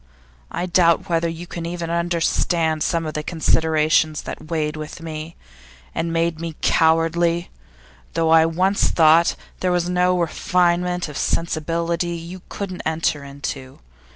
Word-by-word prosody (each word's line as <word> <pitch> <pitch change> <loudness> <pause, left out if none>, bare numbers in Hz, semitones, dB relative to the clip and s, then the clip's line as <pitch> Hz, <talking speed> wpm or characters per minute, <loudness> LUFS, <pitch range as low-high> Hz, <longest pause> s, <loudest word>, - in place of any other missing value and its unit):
I 175 - -3
doubt 175 +1 +3
whether 170 0 +1
you 165 +1 -6
can 170 -1 -6
even 170 -1 -4
understand 170 -1 0
some 165 0 0
of 155 - -4
the 150 - -2
considerations 155 -1 +1
that 155 - -8
weighed 155 -2 -1
with 155 +1 -7
me, 160 0 -7 0.6
and 165 0 -2
made 165 -1 0
me 165 -2 -5
cowardly 165 +1 +2 0.6
though 165 -1 +2
I 160 0 +6
once 185 +5 +1
thought 165 +1 +5 0.2
there 185 - 0
was 175 0 0
no 180 0 +2
refinement 180 +1 +1
of 150 -1 -6
sensibility 170 +1 -1
that 165 0 -7
you 180 +2 -9
couldn't 185 -3 -5
enter 160 -2 -1
into. 140 -1 -6
165 Hz, 145 wpm, -21 LUFS, 160-175 Hz, 0.6 s, I